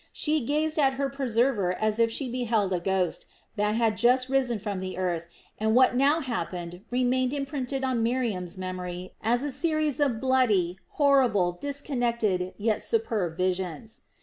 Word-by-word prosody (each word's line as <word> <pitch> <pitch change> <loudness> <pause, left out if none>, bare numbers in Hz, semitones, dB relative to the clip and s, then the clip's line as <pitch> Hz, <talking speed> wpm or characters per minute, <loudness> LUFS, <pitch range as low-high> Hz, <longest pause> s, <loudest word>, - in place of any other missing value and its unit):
She 305 -2 +1
gazed 305 +4 0
at 270 -2 +3
her 275 0 -1
preserver 240 -7 +1
as 215 +3 -1
if 230 0 +4
she 260 +4 -3
beheld 230 -6 0
a 180 - 0
ghost 185 -1 -1 0.3
that 210 0 +1
had 225 -2 +1
just 255 +2 +3
risen 260 -4 +1
from 205 -2 -4
the 185 -1 -5
earth 175 -3 -2 0.3
and 220 +1 +1
what 255 0 +5
now 285 +5 +3
happened 175 - -4
remained 255 +1 +1
imprinted 275 -2 -3
on 255 -3 0
Miriam's 225 -7 -1
memory 185 -1 -5
as 240 +4 +1
a 290 - -2
series 310 +1 0
of 270 -6 +1
bloody, 220 -9 +2
horrible, 255 - +3
disconnected, 235 - -1
yet 215 +1 0
superb 220 - -1
visions. 185 +3 -2
235 Hz, 155 wpm, -27 LUFS, 185-265 Hz, 0.3 s, what